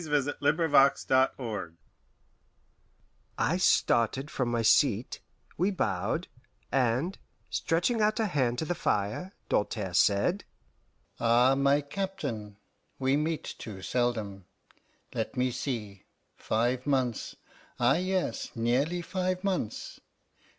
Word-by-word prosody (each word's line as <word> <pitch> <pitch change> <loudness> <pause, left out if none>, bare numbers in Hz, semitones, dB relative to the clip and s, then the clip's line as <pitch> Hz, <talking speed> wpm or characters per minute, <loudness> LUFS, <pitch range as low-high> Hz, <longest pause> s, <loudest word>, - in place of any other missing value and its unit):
XV. - - -7
IN 145 -2 +4
THE 145 - -2
CHAMBER 145 -1 +5
OF 140 0 0 0.3
TORTURE 105 -9 -5 1.6
I - - +1
started 130 +5 +2
from 125 -3 -1
my 120 -1 0
seat; - - +3 0.4
we 185 +4 +3
bowed, 110 - -1 0.4
and, 130 +7 +1 0.3
stretching 180 +8 +1
out 215 +2 +2
a 220 - +2
hand 130 - 0
to 160 - -2
the 175 - -1
fire, 110 - -1
Doltaire 105 -3 -1
said, 100 - +3 0.8
"Ah, 120 +3 +4
my 140 +1 +3
Captain, 140 - -5 0.4
we 135 +1 +2
meet 155 +2 -1 0.2
too 95 -4 -8
seldom. 110 -6 -1 0.7
Let - - -3
me 125 0 +1
see: 110 -6 -5 0.3
five 120 +4 -1
months 130 -5 0 0.4
ah 120 +2 +4
yes, 185 -4 -2
nearly 135 +10 0
five 185 +1 -2
months. 185 - -3
130 Hz, 115 wpm, -29 LUFS, 115-165 Hz, 1.6 s, CHAMBER